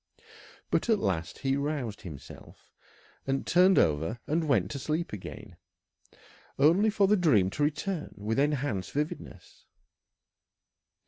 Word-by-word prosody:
But - - +1
at 220 - +5
last 90 - -2
he 135 0 +2
roused 140 -7 -3
himself, 70 -6 -12 0.5
and 135 0 -1
turned 185 +2 +5
over 80 +8 +1
and 160 +1 0
went 105 -10 +2
to 140 - -4
sleep 155 +2 -2
again, 105 - -9 1.0
only 170 +10 +4
for 205 -1 +3
the 205 +2 +4
dream 115 - +3
to 145 - -1
return 155 +3 -2
with 110 +4 -2
enhanced 140 -9 -1
vividness. 150 +2 -5
140 Hz, 125 wpm, -29 LUFS, 100-165 Hz, 1.0 s, at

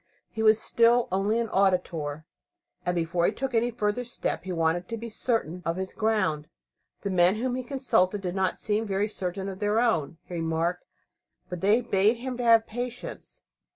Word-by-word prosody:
He 220 - -4
was 215 0 +5
still 235 +2 +3
only 200 +4 +1
an 235 - 0
"auditor," 170 -6 0 0.6
and 180 - +1
before 170 +1 +1
he - - +2
took 270 -1 -4
any 235 +1 +2
further 225 0 -1
step 240 -4 -3
he 190 - -4
wanted 170 +1 0
to 230 - -3
be 230 +1 -6
certain 215 -7 -2
of 165 0 -1
his 190 +1 -4
ground. 190 -9 0 0.5
The 200 - -2
men 180 +1 +4
whom 245 +3 -1
he 255 - -2
consulted 235 -7 +1
did 180 -2 -3
not 190 -1 0
seem 215 +1 -1
very 200 +1 0
certain 190 -2 -4
of 190 -1 -6
their 210 +1 +1
own, 165 - +1
he - - -10
remarked, 165 +1 -1 0.6
but 180 -2 -5
they 210 +5 +4
bade 215 0 +2
him 250 +1 -5
have 230 -2 +5
patience. 245 +2 -6
205 Hz, 185 wpm, -27 LUFS, 180-230 Hz, 0.6 s, was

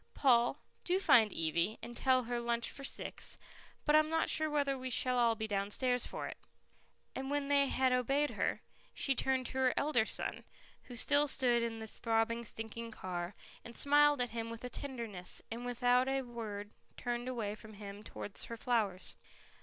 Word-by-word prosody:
Paul, 240 -4 +4 0.3
do 365 +1 +1
find 225 - +5
Evie, 170 +6 0
and 240 +1 -7
tell 255 0 +3
her 240 0 -2
lunch 235 0 +1
for 275 - -8
six, - - -3 0.5
but 300 - +4
I'm 310 0 +5
not 325 0 +1
sure 310 -1 +3
whether 285 -2 +1
we 260 0 -5
shall 250 0 +2
all 230 -1 +4
be 220 0 -3
downstairs 210 +5 +1
for - - -5
it." - - -8 0.8
And 265 0 -4
when 285 -1 -1
they 280 -1 +4
had 260 -1 +2
obeyed 275 +4 +1
her, - - -1 0.3
she 275 - +1
turned 260 0 +1
to 260 - -4
her 255 -1 +3
elder 245 -7 +2
son, - - -2 0.4
who 245 - -9
still 285 +5 +4
stood 245 -3 +4
in 230 -1 -2
the 220 - -6
throbbing 225 +1 0
stinking 225 +1 -5
car, 180 -3 -5 0.3
and 235 - -9
smiled 290 -1 +5
at 245 - -1
him 230 0 -4
with 230 -1 -7
tenderness, 230 -10 -3
and 240 +2 -5
without 245 +1 +3
a 270 0 0
word, 215 -4 -6 0.3
turned 240 0 -3
away 230 -5 -2
from 215 0 -11
him 200 0 -8
towards 205 -1 -5
her 230 - -7
flowers. 220 -6 0
240 Hz, 180 wpm, -34 LUFS, 225-265 Hz, 0.8 s, find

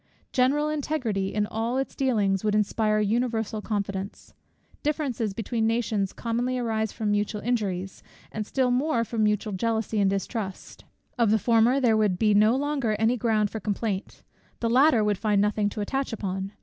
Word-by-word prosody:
General 275 +4 +2
integrity 260 -10 -1
in 210 0 0
all 225 +4 -2
its 270 - -2
dealings 210 -8 +1
would 210 -1 +1
inspire 215 0 +1
universal 220 0 0
confidence: 200 -2 -4 0.5
differences 280 -8 -1
between 225 +2 -1
nations 220 -4 0
commonly 245 +2 -2
arise 220 -3 -1
from 215 -2 -2
mutual 205 +1 0
injuries, 195 -6 -2 0.3
and 215 -1 -4
still 260 -2 +1
more 250 -1 +1
from 230 0 -3
mutual 210 0 0
jealousy 220 +1 -1
and 195 -1 +3
distrust. 195 0 -4 0.3
Of 230 -3 +4
the 220 - +4
former 235 +4 +3
there 240 -4 +3
would 210 -4 +2
be 210 +2 +3
no 215 +3 +5
longer 275 -5 0
any 225 +3 +2
ground 215 -3 +1
for 220 - -4
complaint; 205 -2 -3 0.4
the 230 -1 0
latter 260 -2 +5
would 205 -2 0
find 210 -2 +2
nothing 210 0 +1
to 210 - -5
attach 270 +6 -2
upon. 195 -2 -4
220 Hz, 165 wpm, -26 LUFS, 205-240 Hz, 0.5 s, no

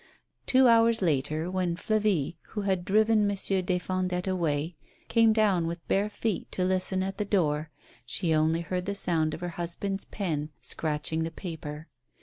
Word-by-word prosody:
Two 260 0 +5
hours 230 -2 +4
later, 155 +2 0
when 180 -2 -1
Flavie, 205 -6 0 0.2
who 210 - -2
had 190 -3 -1
driven 215 +1 +3
Monsieur 195 -1 0
des 180 0 0
Fondettes 180 0 -2
away, 165 -3 -1 0.3
came 230 -1 +5
down 205 -6 +2
with 170 0 -6
bare 200 +2 +1
feet 210 -1 -3
to 185 - 0
listen 185 0 +2
at 195 +1 -5
the - - +1
door, 155 -7 0 0.3
she 140 +7 +1
only 160 +2 +2
heard 180 +2 -3
the 200 - -1
sound 160 -5 +2
of - - -11
her 175 - -3
husband's 195 +3 -2
pen 155 -7 -3
scratching 155 +1 -1
the 165 - -1
paper. 160 -3 -7
180 Hz, 165 wpm, -28 LUFS, 160-200 Hz, 0.3 s, Two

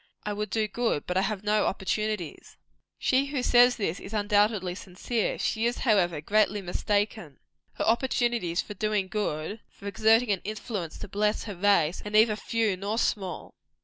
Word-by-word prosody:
I 210 - -2
would 210 0 -3
do 215 +1 0
good, 225 -8 -1
but 180 - -3
I 190 - +3
have 200 0 -2
no 210 0 +2
opportunities." 205 -2 -3 0.4
She 270 +2 +2
who 275 -3 -2
says 245 0 +5
this, 195 -5 -2
is 195 - -10
undoubtedly 205 -2 +2
sincere. 200 +5 -3
She 225 +1 0
is, 240 - -2
however, 180 - +3
greatly 210 +4 +2
mistaken. 200 -4 -2 0.4
Her - - -2
opportunities 235 -6 +1
for 210 - -8
doing 210 -1 -1
good 200 -1 -3
for 200 - -16
exerting 220 +3 +3
an 195 - 0
influence 210 -5 -5
to - - -7
bless 210 +2 0
her 210 - -6
race 180 -3 +2
"are 210 - -5
neither 215 +1 +4
few 220 -2 0
nor 200 +4 -3
small." 195 -5 -2
210 Hz, 170 wpm, -27 LUFS, 190-220 Hz, 0.4 s, says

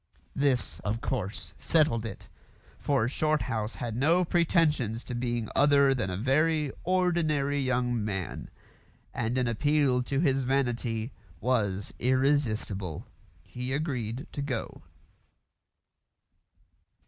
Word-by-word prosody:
This, 140 -4 +1
of 105 +2 -2
course, 100 -8 -3
settled 145 -9 +2
it, 100 - -9 0.5
for 135 -6 +1
Shorthouse 125 -7 -1
had 115 -3 -4
no 165 +8 +3
pretensions 155 - +2
to 125 - -6
being 120 -2 -2
other 140 -1 +5
than 120 -8 -1
a 90 - -3
very 150 +5 +2
ordinary 165 -6 +1
young 125 -3 0
man, 95 -4 -4 0.6
and 120 +2 -1
an 125 -1 +1
appeal 140 +1 +2
to 135 +2 -1
his 135 -4 +2
vanity 120 -3 -1 0.3
was 105 -4 0
irresistible. 120 - 0 0.4
He 125 +1 -5
agreed 130 -4 -2
to 145 - -4
go. 135 -5 -4
130 Hz, 110 wpm, -28 LUFS, 115-145 Hz, 0.6 s, other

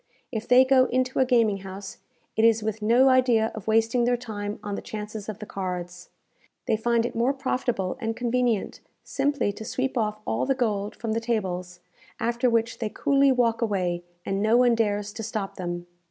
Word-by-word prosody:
If 225 -2 -4
they 255 +1 +7
go 260 -1 +5
into 255 +1 0
a 260 - +5
gaming 230 -5 +3
house, 195 0 -8 0.4
it 220 - +2
is 225 -1 +4
with 220 0 -3
no 235 +5 +5
idea 245 -4 +3
of 220 -3 -9
wasting 225 +2 +2
their 245 +1 +2
time 210 -4 -5
on 205 - -4
the - - -3
chances 210 0 -6
of 210 - -5
the 215 - -8
cards. 180 -3 -5 0.6
They 220 - +2
find 235 +1 +1
it - - -3
more 240 +4 +1
profitable 250 -7 -2
and 225 -1 -2
convenient 245 -3 0 0.2
simply 280 -7 0
to 220 - -8
sweep 260 +2 -2
off 215 -1 -1
all - - -1
the 270 - +2
gold 210 -5 -1
from 225 -1 -4
the 225 - +1
tables, 185 -6 -3 0.4
after 235 +2 +1
which 230 0 0
they 220 - -2
coolly 275 +3 +3
walk 240 -3 +2
away, 180 -6 -1 0.2
and 195 0 -1
no 220 +3 +4
one 245 -1 +5
dares 210 -2 0
to 225 - -6
stop 215 -2 -4
them. 175 -1 -4
225 Hz, 195 wpm, -25 LUFS, 205-245 Hz, 0.6 s, they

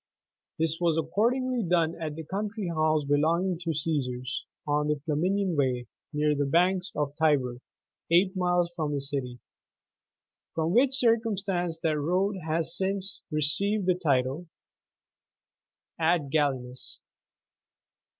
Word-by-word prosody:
This 160 0 0
was 165 -2 +2
accordingly 240 - +1
done 170 -4 +1
at 155 -2 -3
the 160 - -6
country 200 +3 -3
house 155 -2 +1
belonging 165 +5 +1
to 170 -1 -5
the 160 - 0
Caesars, 135 -5 -2 0.2
on 150 0 +1
the 150 - +2
Flaminian 180 +4 0
Way, 130 -4 0 0.3
near 150 0 +1
the 145 -1 0
banks 180 +4 +2
of 150 -1 0
the 145 - -35
Tiber, 140 -6 +2 0.5
eight 185 +3 +4
miles 180 -1 +1
from 155 -3 -2
the - - -1
City; 135 -3 -2 1.2
from 165 +1 0
which 260 +3 +4
circumstance 205 -8 +1
that 155 -2 +1
road 185 +6 0
has 165 +1 0
since 195 0 -1
received 185 +7 +3
the 180 - +4
title 145 -1 0 1.5
"Ad 160 -4 +1
gallinas." 130 -4 -2
165 Hz, 130 wpm, -28 LUFS, 150-185 Hz, 1.5 s, eight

